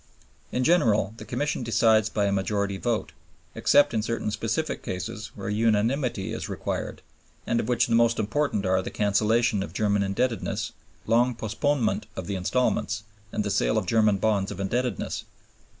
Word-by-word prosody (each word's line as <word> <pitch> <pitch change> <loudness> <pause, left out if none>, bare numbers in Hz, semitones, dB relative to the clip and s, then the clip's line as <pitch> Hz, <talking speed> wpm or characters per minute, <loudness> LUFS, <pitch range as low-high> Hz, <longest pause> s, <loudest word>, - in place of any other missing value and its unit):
In 125 - 0
general 110 - +3
the - - -9
Commission 145 +3 -2
decides 110 -2 +3
by 105 -2 0
a 100 - +1
majority 100 0 0
vote, 115 -1 -1 0.4
except 145 -2 +4
in 110 - +1
certain 115 -1 -2
specific 115 +8 -2
cases 110 +4 -5
where - - -6
unanimity 110 +1 +1
is - - -5
required, - - -4 0.4
of 120 -2 0
which 120 0 +3
the - - -1
most 115 0 +4
important 110 -1 0
are 95 0 +2
the - - -5
cancellation 105 +1 +2
of 100 - -5
German 105 -1 +1
indebtedness, 110 +5 -1 0.3
long 120 +2 +3
postponement 115 +3 0
of - - -5
the 100 - -3
instalments, 105 +1 0 0.3
and - - -1
the 105 - -2
sale 100 +2 +2
of 105 - 0
German 105 0 +3
bonds 100 -1 +1
of - - -7
indebtedness. 115 +2 -2
110 Hz, 160 wpm, -26 LUFS, 100-120 Hz, 0.4 s, except